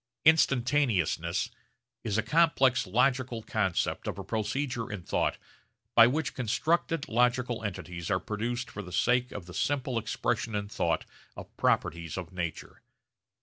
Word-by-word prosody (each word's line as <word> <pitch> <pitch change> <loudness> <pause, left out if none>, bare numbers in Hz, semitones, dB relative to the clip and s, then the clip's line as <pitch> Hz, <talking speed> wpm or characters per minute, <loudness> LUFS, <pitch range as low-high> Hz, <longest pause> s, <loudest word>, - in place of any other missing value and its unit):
Instantaneousness 120 - +2 0.5
is 110 -2 -1
a 110 - +2
complex 135 - +3
logical 125 +2 +1
concept 105 -6 -1
of - - -3
a - - -5
procedure 120 +1 -2
in 100 -4 -5
thought - - 0 0.6
by 115 0 +8
which 150 +4 -1
constructed 155 +6 0
logical 120 0 +1
entities 90 -4 -5
are 95 - +2
produced 120 +6 -3
for 105 - -6
the 90 -2 -10
sake 125 +5 +2
of 100 -4 -7
the 90 - -11
simple 130 +2 0
expression 110 0 -2
in 100 0 -2
thought - - -1 0.3
of - - -10
properties 85 0 0
of 95 0 -6
nature. 85 -3 -5
115 Hz, 140 wpm, -29 LUFS, 100-130 Hz, 0.6 s, by